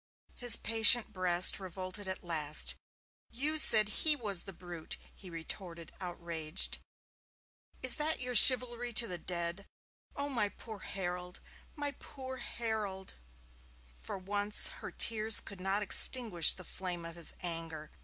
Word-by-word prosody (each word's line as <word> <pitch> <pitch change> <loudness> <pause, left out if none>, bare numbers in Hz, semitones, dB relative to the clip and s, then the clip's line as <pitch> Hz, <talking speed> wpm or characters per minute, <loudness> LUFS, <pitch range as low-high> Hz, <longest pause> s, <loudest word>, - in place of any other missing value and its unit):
His 245 -2 +3
patient 225 0 +4
breast 180 -1 +1
revolted 185 +1 -8
at 190 0 -7
last. 155 -3 +1 0.6
'You 300 +6 0
said 215 -8 +5
he 305 +8 0
was 205 -9 -2
the 195 - -9
brute!' 175 -2 -9 0.2
he 190 - -14
retorted, 170 0 -9
outraged. 170 -2 -3 1.0
'Is 255 - +4
that 310 +1 -1
your 250 0 -6
chivalry 245 0 +6
to 230 - +2
the 180 -5 -5
dead? 170 +3 -5 0.5
Oh, 285 0 -4
my 230 -7 -3
poor 220 0 -13
Harold, 180 -2 -8 0.4
my 290 -2 -5
poor 260 -1 -10
Harold!' 215 -6 -7 0.8
For - - -9
once 205 +2 +2
her - - -8
tears 220 -1 +4
could 195 -2 -11
not 195 +2 -3
extinguish 210 -5 +5
the 185 - -11
flame 175 -2 -6
of 165 0 -10
his 170 -1 -5
anger. 165 -3 -6
195 Hz, 135 wpm, -30 LUFS, 175-230 Hz, 1.0 s, chivalry